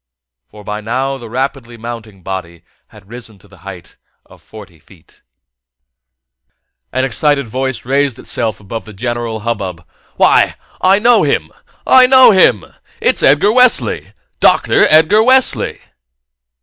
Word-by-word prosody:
For 105 Hz, +6 st, -15 dB
by 105 Hz, +1 st, -6 dB
now 130 Hz, +5 st, -3 dB
the 115 Hz, -2 st, -11 dB
rapidly 125 Hz, -1 st, -5 dB
mounting 115 Hz, -4 st, -10 dB
body 85 Hz, -3 st, -7 dB, 0.2 s
had 95 Hz, -, -19 dB
risen 115 Hz, -2 st, -12 dB
to -, -, -22 dB
the -, -, -20 dB
height 95 Hz, -3 st, -12 dB, 0.3 s
of -, -, -20 dB
forty 95 Hz, -7 st, -15 dB
feet. 85 Hz, +2 st, -23 dB, 1.7 s
An 130 Hz, 0 st, -1 dB
excited 140 Hz, +3 st, 0 dB
voice 130 Hz, +1 st, -4 dB
raised 140 Hz, -1 st, -1 dB
itself 110 Hz, -2 st, -5 dB
above 110 Hz, +2 st, -8 dB
the 110 Hz, -, -12 dB
general 120 Hz, +1 st, -5 dB
hubbub. 95 Hz, -7 st, -5 dB, 0.3 s
"Why, -, -, +2 dB, 0.3 s
I 190 Hz, +1 st, +3 dB
know 235 Hz, +3 st, +3 dB
him! -, -, -1 dB, 0.3 s
I 255 Hz, -1 st, +6 dB
know 260 Hz, -1 st, +6 dB
him! 125 Hz, -, +3 dB, 0.3 s
It's -, -, 0 dB
Edgar 150 Hz, +9 st, +3 dB
Wesley! 250 Hz, +1 st, +2 dB, 0.3 s
Doctor -, -, +3 dB
Edgar 160 Hz, +7 st, +4 dB
Wesley!" 260 Hz, +2 st, +1 dB
120 Hz, 135 wpm, -14 LUFS, 105-145 Hz, 1.7 s, I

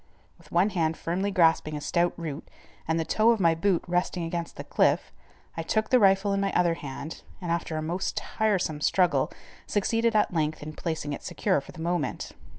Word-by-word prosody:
With -, -, -20 dB
one 185 Hz, +5 st, +3 dB
hand 165 Hz, -4 st, 0 dB
firmly 185 Hz, +4 st, -1 dB
grasping 165 Hz, -5 st, +3 dB
a -, -, -4 dB
stout 175 Hz, +4 st, +1 dB
root, 155 Hz, -3 st, -6 dB, 0.4 s
and 160 Hz, +1 st, +1 dB
the 160 Hz, -, -1 dB
toe 220 Hz, +6 st, +3 dB
of 230 Hz, -2 st, +3 dB
my 170 Hz, -3 st, +4 dB
boot 175 Hz, +1 st, +1 dB
resting 175 Hz, 0 st, -1 dB
against 165 Hz, 0 st, -4 dB
the -, -, -6 dB
cliff, -, -, +1 dB, 0.4 s
I 165 Hz, -, -2 dB
took 220 Hz, +6 st, -1 dB
the 255 Hz, -, +6 dB
rifle 195 Hz, -1 st, +4 dB
in 195 Hz, -, +1 dB
my 195 Hz, 0 st, 0 dB
other 175 Hz, -1 st, +3 dB
hand, 145 Hz, 0 st, -7 dB, 0.2 s
and 175 Hz, -3 st, -3 dB
after 170 Hz, -1 st, -2 dB
a 155 Hz, -, -2 dB
most 175 Hz, +4 st, -2 dB
tiresome 190 Hz, -8 st, 0 dB
struggle, 180 Hz, +2 st, +2 dB, 0.4 s
succeeded 225 Hz, +2 st, +1 dB
at 210 Hz, -3 st, +3 dB
length 155 Hz, -2 st, -1 dB
in 155 Hz, +1 st, -7 dB
placing 155 Hz, -3 st, -3 dB
it -, -, -6 dB
secure -, -, 0 dB
for -, -, -12 dB
the 160 Hz, -, -10 dB
moment. 170 Hz, -2 st, -2 dB
170 Hz, 200 wpm, -27 LUFS, 160-195 Hz, 0.4 s, the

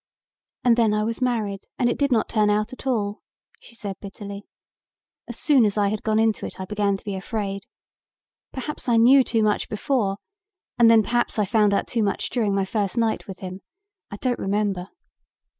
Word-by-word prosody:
"And 240 Hz, -1 st, +4 dB
then 220 Hz, -3 st, +3 dB
I 210 Hz, -, +1 dB
was 230 Hz, +3 st, -3 dB
married 215 Hz, -6 st, -1 dB
and 245 Hz, -, +2 dB
it 240 Hz, -, +1 dB
did 280 Hz, -1 st, +1 dB
not 225 Hz, -3 st, +2 dB
turn 210 Hz, -2 st, +2 dB
out 210 Hz, +3 st, 0 dB
at 260 Hz, -, -8 dB
all," 210 Hz, -4 st, -1 dB, 0.4 s
she 235 Hz, -, -14 dB
said 200 Hz, -4 st, -5 dB
bitterly. 200 Hz, 0 st, -8 dB, 0.8 s
"As -, -, -5 dB
soon 280 Hz, -5 st, +4 dB
as 210 Hz, -1 st, +1 dB
I 205 Hz, -1 st, +3 dB
had 215 Hz, 0 st, -3 dB
gone 215 Hz, -1 st, 0 dB
into 220 Hz, -1 st, +2 dB
it -, -, -12 dB
I 190 Hz, -, -4 dB
began 200 Hz, 0 st, 0 dB
to -, -, -20 dB
be 205 Hz, -, -3 dB
afraid. 195 Hz, 0 st, -4 dB, 0.8 s
Perhaps 275 Hz, 0 st, -5 dB
I 235 Hz, -, +4 dB
knew 260 Hz, +4 st, +7 dB
too 225 Hz, -3 st, +1 dB
much 210 Hz, -1 st, 0 dB
before 210 Hz, -3 st, 0 dB, 0.6 s
and 235 Hz, -1 st, +7 dB
then 225 Hz, -1 st, +6 dB
perhaps 240 Hz, +3 st, 0 dB
I 210 Hz, -, +2 dB
found 210 Hz, -1 st, +3 dB
out 200 Hz, -, +1 dB
too 235 Hz, -, -1 dB
much 200 Hz, -2 st, -1 dB
during 215 Hz, -5 st, 0 dB
my 195 Hz, -1 st, +1 dB
first 205 Hz, +1 st, -2 dB
night 230 Hz, -1 st, 0 dB
with 190 Hz, -2 st, -9 dB
him. 185 Hz, 0 st, -7 dB, 0.5 s
I -, -, -6 dB
don't 245 Hz, +2 st, -1 dB
remember. 195 Hz, -2 st, -1 dB
215 Hz, 200 wpm, -24 LUFS, 200-235 Hz, 0.8 s, knew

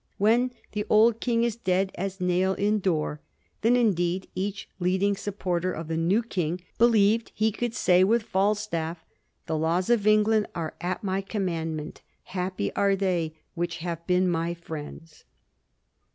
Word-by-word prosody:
When 230 Hz, +5 st, +3 dB, 0.2 s
'the 210 Hz, 0 st, -2 dB
old 220 Hz, +1 st, +5 dB
King 235 Hz, -1 st, +1 dB
is 235 Hz, -2 st, 0 dB
dead 190 Hz, -3 st, 0 dB
as 195 Hz, +1 st, -4 dB
nail 180 Hz, +1 st, +1 dB
in 210 Hz, +1 st, +1 dB
door,' 155 Hz, -5 st, -1 dB, 0.4 s
then 230 Hz, +3 st, +4 dB
indeed 185 Hz, -6 st, +1 dB
each 200 Hz, +1 st, -3 dB
leading 190 Hz, +3 st, +1 dB
supporter 185 Hz, -3 st, -2 dB
of 165 Hz, -2 st, -6 dB
the 165 Hz, -, -1 dB
new 180 Hz, +8 st, +2 dB
king 180 Hz, -6 st, -2 dB, 0.2 s
believed 225 Hz, -1 st, +4 dB
he 220 Hz, +1 st, +2 dB
could 235 Hz, +2 st, -3 dB
say 180 Hz, -5 st, +4 dB
with 225 Hz, +4 st, +3 dB
Falstaff, 190 Hz, -5 st, -1 dB, 0.2 s
' -, -, -47 dB
The 160 Hz, -, -2 dB
laws 170 Hz, +6 st, +1 dB
of 215 Hz, -3 st, +2 dB
England 215 Hz, 0 st, +4 dB
are 160 Hz, -2 st, -3 dB
at 180 Hz, +3 st, -3 dB
my 190 Hz, 0 st, -1 dB
commandment; 165 Hz, -6 st, -3 dB, 0.2 s
happy 185 Hz, 0 st, -3 dB
are 200 Hz, -1 st, +3 dB
they 175 Hz, -5 st, -1 dB, 0.2 s
which 170 Hz, -1 st, -3 dB
have 170 Hz, -1 st, -4 dB
been 180 Hz, 0 st, +3 dB
my 170 Hz, 0 st, -1 dB
friends.' 160 Hz, -1 st, -9 dB
190 Hz, 155 wpm, -26 LUFS, 170-210 Hz, 0.4 s, old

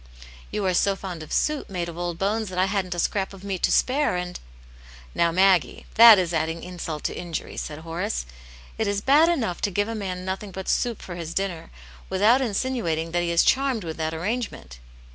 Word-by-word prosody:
You 210 Hz, -, -2 dB
are 185 Hz, -, +2 dB
so 195 Hz, +2 st, +2 dB
fond 185 Hz, -4 st, -7 dB
of 155 Hz, -, -10 dB
soup 300 Hz, -2 st, 0 dB
made 180 Hz, -3 st, -3 dB
of 170 Hz, -, -7 dB
old 175 Hz, -1 st, -3 dB
bones 210 Hz, +3 st, -1 dB
that 180 Hz, -, -7 dB
I 185 Hz, -, +4 dB
hadn't 190 Hz, -2 st, -2 dB
a -, -, -4 dB
scrap 195 Hz, +2 st, -1 dB
of 190 Hz, -, -14 dB
meat 195 Hz, -3 st, -3 dB
to -, -, +2 dB
spare, 270 Hz, -5 st, +2 dB
and 180 Hz, 0 st, -4 dB, 0.4 s
" -, -, -22 dB, 0.3 s
"Now, 170 Hz, 0 st, +2 dB
Maggie, 185 Hz, -1 st, +3 dB
that 230 Hz, -1 st, +10 dB
is 175 Hz, -2 st, 0 dB
adding 165 Hz, +1 st, -1 dB
insult 170 Hz, -4 st, -6 dB
to -, -, -2 dB
injury," 170 Hz, -2 st, -5 dB
said 150 Hz, -, -5 dB
Horace. 160 Hz, -, -3 dB, 0.3 s
" -, -, -20 dB
It 220 Hz, -, +1 dB
is 200 Hz, 0 st, 0 dB
bad 295 Hz, +8 st, +5 dB
enough 230 Hz, -, -1 dB
to -, -, +1 dB
give 205 Hz, +2 st, 0 dB
a 230 Hz, -, -3 dB
man 185 Hz, -4 st, -4 dB
nothing 190 Hz, +2 st, -4 dB
but 190 Hz, 0 st, -7 dB
soup 235 Hz, -3 st, 0 dB
for 180 Hz, -, -7 dB
his 165 Hz, -1 st, -6 dB
dinner, 190 Hz, -4 st, -2 dB, 0.4 s
without 210 Hz, +7 st, +4 dB
insinuating 200 Hz, -9 st, -1 dB
that 175 Hz, +1 st, +1 dB
he 175 Hz, -, -1 dB
is 170 Hz, 0 st, +4 dB
charmed 265 Hz, -5 st, +2 dB
with 160 Hz, -2 st, -6 dB
that 160 Hz, 0 st, -2 dB
arrangement." 175 Hz, -, -4 dB
185 Hz, 220 wpm, -24 LUFS, 170-210 Hz, 0.4 s, that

